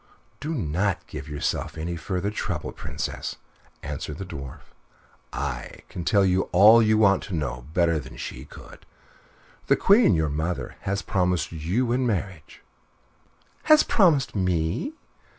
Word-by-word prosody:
"Do 155 +4 -3
not 90 - -1
give 70 +3 -8
yourself 75 +2 -3
any 85 +2 -3
further 95 +4 -3
trouble, 105 - -3
Princess," - - -5 0.5
answered 75 - -5
the 95 - -6
Dwarf. 70 -7 -9 0.6
"I 60 -1 -5
can 85 - -6
tell 100 +1 +4
you 95 0 +1
all 105 +6 +8
you 110 -1 +3
want 100 -3 +4
to 95 - -4
know 65 -5 -4
better 85 -3 +3
than 65 -2 -11
she - - -7
could. - - -14 0.8
The - - +5
Queen, 205 - +5
your 80 -1 +1
mother, 80 +5 -3 0.2
has 100 0 -1
promised 90 -4 0
you 90 +10 -1
in 125 +1 +1
marriage 95 -7 -4 0.5
" - - -36
"Has 310 0 +8
promised 165 - +3
_me! 90 - -1
90 Hz, 145 wpm, -25 LUFS, 80-110 Hz, 0.8 s, all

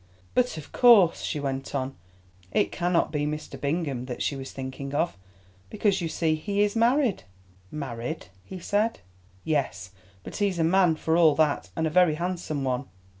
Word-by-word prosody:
"But 250 -9 +1
of 155 - -9
course," 220 -9 +6
she 150 - -2
went 135 0 -3
on, 135 0 -2 0.6
"it - - +1
cannot 175 -2 +1
be 150 -1 -1
Mr. 150 0 -6
Bingham 140 -4 -1
that 125 -2 -4
she 145 - -1
was 135 0 -7
thinking 135 +1 -6
of, 170 - 0 0.5
because 195 - +1
you 165 - -2
see 160 -1 +1
he 200 +6 0
is 205 +1 0
married." 240 - +2 0.5
"Married?" 125 -5 -5 0.2
he 190 - -8
said, 205 - 0 0.4
"yes, 100 - -1 0.3
but - - -7
he's 200 -3 0
a 165 - +2
man 175 0 +4
for 160 +1 0
all 160 -4 +5
that, 155 -2 +1
and 160 - 0
a 160 - 0
very 175 -2 +4
handsome 170 -4 -3
one." 130 0 -1
160 Hz, 175 wpm, -26 LUFS, 140-185 Hz, 0.6 s, course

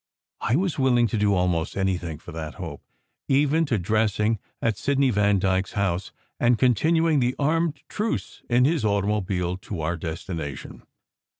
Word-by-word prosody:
I 115 - +1
was 180 -1 0
willing 125 -3 +4
to 115 - -1
do 105 -1 +3
almost 90 -2 0
anything 90 -5 -1
for 85 - -11
that 80 -2 -6
hope, 80 -6 -7 0.5
even 145 +4 +3
to 120 -6 0
dressing 105 +2 +1 0.2
at 115 -2 0
Sidney 135 +3 +1
Vandyke 100 -2 +2
s - - -11
house, 95 -2 -1 0.3
and 120 0 +3
continuing 155 +6 +3
the 125 0 +1
armed 155 0 0
truce 215 +2 -3
in 125 +1 +4
his 155 -2 +1
automobile 100 -3 0
to 95 -2 -6
our 80 +3 -1
destination. 80 -3 -6
105 Hz, 155 wpm, -25 LUFS, 90-135 Hz, 0.5 s, willing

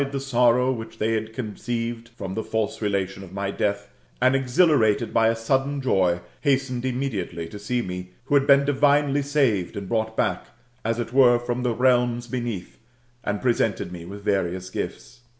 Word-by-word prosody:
t04 - - +4
THK - - -2
METAMORPHOSIS, 135 0 -4
OR - - -9
sorrow 125 +1 +4
which 115 -2 -6
they 110 +1 0
had 110 0 -2
concetTed 115 0 -4
from 95 -1 -5
the 110 - -2
&lse 110 -1 -2
relation 95 -2 -1
of 95 -1 -12
my 100 0 -2
death, 100 0 -2 0.3
and 130 +2 +4
exhilarated 130 - +3
by 115 -1 +4
a 115 - +2
sudden 135 +5 0
joy, 95 -9 +2 0.2
hastened 135 -3 0
immediately 120 -10 -3
to 105 +5 -9
see 120 +4 -1
me, 90 0 -6 0.2
who 140 - -3
had 140 -1 +4
been 140 0 +6
dirinely 145 0 +3
saved 135 -12 +1
and 100 -1 -5
brought 110 +1 -1
back - - 0 0.4
as 115 +1 0
it 120 0 -4
were 125 -2 +6
from 120 +1 -3
the 125 -2 0
realms 120 -1 +2
beneath, 120 -6 -5 0.4
and 105 +2 -2
presented 110 -6 +1
me 85 -2 -7
with 100 +4 -9
various 95 -2 -1
gifts. 125 +1 -6
115 Hz, 185 wpm, -24 LUFS, 100-130 Hz, 0.4 s, been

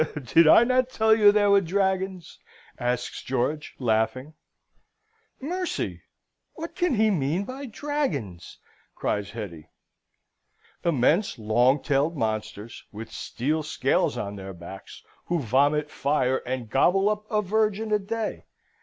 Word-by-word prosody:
Did 165 +5 +5
I 220 - +8
not 255 +1 +2
tell 220 -3 +3
you 210 -2 +6
there 205 -1 +3
were 200 0 +6
dragons?" 190 -1 -2 0.4
asks 125 0 -2
George, 135 +4 -2
laughing. 125 +4 0 1.1
"Mercy! 355 +6 -3 0.5
What 330 +1 -7
can 350 -7 0
he 215 0 +3
mean 165 +2 0
by 260 +5 -7
dragons?" 200 - -4 0.4
cries 100 -1 -2
Hetty. 90 -8 -8 1.1
"Immense, 165 - +2
long 120 +5 +2
tailed 145 +3 +1
monsters, 110 -1 -4
with 110 +2 -9
steel 150 +6 -2
scales 155 - 0
on 100 0 -4
their 95 0 -7
backs, 85 +3 -11 0.2
who 175 - 0
vomit 145 +4 +1
fire, 130 -3 +1
and 125 -2 -3
gobble 180 - +3
up 210 0 -2
a 210 -1 +1
virgin 215 +2 0
a 210 - +3
day. 220 +2 -4
155 Hz, 130 wpm, -25 LUFS, -, 1.1 s, I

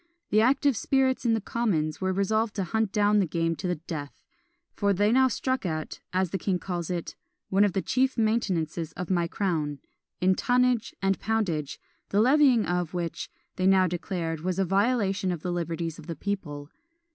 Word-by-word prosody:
The 215 - +5
active 270 +3 +3
spirits 260 +3 +1
in 230 -1 +3
the - - 0
commons 195 -9 -1
were 190 0 +1
resolved 215 +3 0
to 200 - -1
hunt 220 +2 -1
down 210 0 +3
the 190 - +2
game 165 +1 0
to 190 - -3
the 180 - 0
death: 150 -2 -7 0.5
for 200 -1 +1
they 205 +3 +2
now 260 +2 +5
struck 260 +1 -1
at, 155 -4 -4
as 185 -1 0
the 195 - -2
king 185 +1 0
calls 175 -2 -4
it, 175 -2 -4 0.3
"one 195 +2 +4
of 205 -3 +2
the 190 - -1
chief 260 0 +1
maintenances 190 -8 0
of 180 +1 -5
my 175 -2 +2
crown," 160 -6 -1 0.4
in 185 +1 +4
tonnage 245 +2 +1
and 195 0 +2
poundage, 180 -10 -1 0.3
the 200 - +2
levying 260 -1 +5
of 175 -1 -2
which, 170 -2 -3 0.3
they 185 - +2
now 190 -1 +5
declared, 170 -2 -3
was 180 +2 -2
a 195 - +2
violation 195 -1 +1
of 170 -3 -5
the 180 - -2
liberties 165 -1 -3
of 155 - -12
the 165 - -4
people. 150 -5 -5
190 Hz, 190 wpm, -27 LUFS, 170-220 Hz, 0.5 s, The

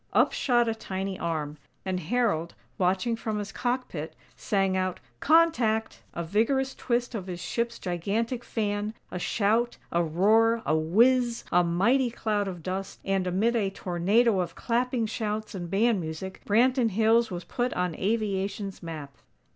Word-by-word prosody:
Up - - +4
shot 240 -3 +2
a 225 - +1
tiny 195 -3 -4
arm; 155 -3 -3 0.3
and 185 -1 -1
Harold, 180 -3 0 0.2
watching 190 +6 +1
from 220 -1 -3
his 205 -1 -4
cockpit, 245 - -3 0.2
sang 195 -2 0
out: 185 -1 -1 0.2
"CONTACT!!" 275 -9 +3
A 170 - -2
vigorous 230 +9 +1
twist 245 0 -1
of 195 -5 -5
his 180 -2 -5
ship's 235 +5 -2
gigantic 215 +8 -2
"fan" 210 -1 -2 0.2
a 180 - -4
shout, 225 +5 +1
a 170 - +2
roar, 220 +8 +3
a 155 - +2
whizz, 235 +9 +3
a 180 0 +5
mighty 235 +10 +2
cloud 210 -3 -1
of 175 -4 -6
dust, 190 +2 -4
and 195 -1 0
amid 210 +7 +1
a 205 -4 +1
tornado 195 +4 +2
of 180 - -2
clapping, 245 0 0
shouts, 215 0 -3
and 175 -3 -5
band 210 +1 +2
music, 160 +4 -6
Branton 245 +3 +3
Hills 225 +3 +3
was 175 -1 -5
put 245 0 -2
on 180 -2 -1
aviation's 200 -1 -2
map. 155 -5 -7
205 Hz, 155 wpm, -27 LUFS, 180-235 Hz, 0.3 s, a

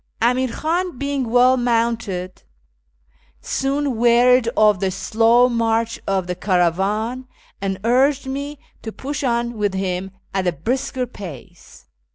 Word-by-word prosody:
Amir 250 +3 +2
Khan, 345 +1 -2
being 280 -2 -2
well 250 +2 +5
mounted, 230 -6 -1 1.0
soon 275 -2 -1
wearied 240 +1 +4
of 210 -3 +4
the 190 - 0
slow 225 +5 +3
march 230 -1 0
of 195 -2 0
the 180 - -3
caravan, 200 +8 0 0.3
and 195 -1 -2
urged 265 +4 +2
me 280 +2 -5 0.2
to 220 - -6
push 285 +5 -5
on 235 -2 -1
with 205 -2 0
him 190 0 -2 0.2
at 190 -1 -1
a 175 - +1
brisker 250 - -2
pace. 185 - -12
235 Hz, 130 wpm, -20 LUFS, 195-255 Hz, 1.0 s, well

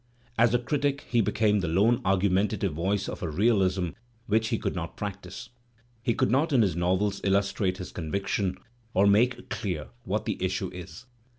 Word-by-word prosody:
As 115 0 +4
a - - +6
critic, 140 +3 -1
he 120 -2 +3
became 105 0 +2
the 90 - -1
lone 105 +9 +3
argumentative 95 0 +1
voice 95 +5 -1
of - - -6
a 85 - -2
realism 95 -1 +2 0.4
which 110 +1 +2
he 115 -1 0
could - - -2
not 85 -2 -5
practise; 100 -3 -6 0.5
he 115 -1 0
could - - +1
not 145 +6 +2
in 125 -5 +5
his 95 -6 0
novels 95 +3 0
illustrate 100 -1 +1
his 90 -2 -7
conviction, 95 +2 -2 0.4
or 95 - +5
make 120 +5 +2
clear 90 - -3
what - - -2
the - - -3
issue - - -1
is. 90 +5 -9
100 Hz, 175 wpm, -27 LUFS, 90-115 Hz, 0.5 s, a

